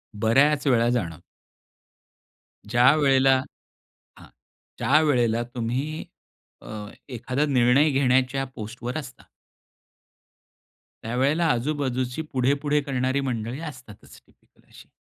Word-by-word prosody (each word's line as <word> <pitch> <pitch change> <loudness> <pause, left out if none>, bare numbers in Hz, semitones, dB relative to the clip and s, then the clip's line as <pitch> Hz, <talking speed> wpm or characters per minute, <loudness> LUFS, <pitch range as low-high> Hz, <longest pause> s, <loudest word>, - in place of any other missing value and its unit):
बऱ्याच 135 +7 +2
वेळा 120 -2 +3
जाण. 90 -11 -2 1.5
ज्यावेळेला 135 +2 +4 0.8
हां, - - -15 0.5
ज्यावेळेला 125 -6 +2
तुम्ही 130 +7 -3 0.6
अ, - - -12 0.4
एखादा 130 +3 -2
निर्णय 135 +3 +3
घेण्याच्या 130 0 +1
पोस्टवर 120 +4 -6
असता. 130 -5 -10 1.8
त्यावेळेला 135 +8 +1
आजूबाजूची 130 +1 -2
पुढे-पुढे 140 +3 +1
करणारी 130 0 -1
मंडळी 115 +3 -4
असतातच 125 -7 -14
टिपिकल - - -31
अशी. - - -16
130 Hz, 85 wpm, -24 LUFS, 120-140 Hz, 1.8 s, ज्यावेळेला